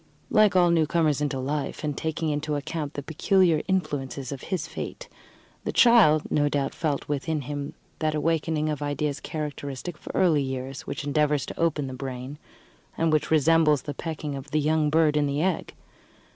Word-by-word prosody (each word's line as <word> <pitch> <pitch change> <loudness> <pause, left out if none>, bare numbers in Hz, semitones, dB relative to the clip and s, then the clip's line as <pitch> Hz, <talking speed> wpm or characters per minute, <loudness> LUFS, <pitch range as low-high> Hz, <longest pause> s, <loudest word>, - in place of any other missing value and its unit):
Like 215 -3 +5
all 175 -2 +5
newcomers 160 -2 +2
into 145 -2 -1
life, 140 +4 -3
and 150 -2 -1
taking 160 +1 -2
into 150 0 -1
account 145 0 -4
the 145 - -4
peculiar 165 +2 +2
influences 140 -8 -2
of 135 -2 -6
his 180 -5 -3
fate, - - -7 0.6
the - - -2
child 215 -11 +6
no 145 -1 +2
doubt 140 -1 -1
felt 150 -4 -2
within 150 +2 -1
him 145 +2 -5 0.2
that 155 -1 0
awakening 155 0 0
of 150 -2 -2
ideas 145 0 -2
characteristic 150 +1 -5
of - - -19
early 165 -6 +4
years, 130 0 -5
which - - -4
endeavours 145 0 +1
to - - -8
open 155 -4 +1
the 130 - -6
brain, 130 +2 -6 0.6
and 165 -1 +2
which 155 - +1
resembles 155 -1 +4
the 145 - -4
pecking 155 -1 -5
of 135 +1 -8
the 155 - +1
young 155 0 +2
bird 155 -1 +3
in 150 -1 +2
the 140 +3 0
egg. 185 -3 -1
150 Hz, 175 wpm, -26 LUFS, 145-160 Hz, 0.6 s, child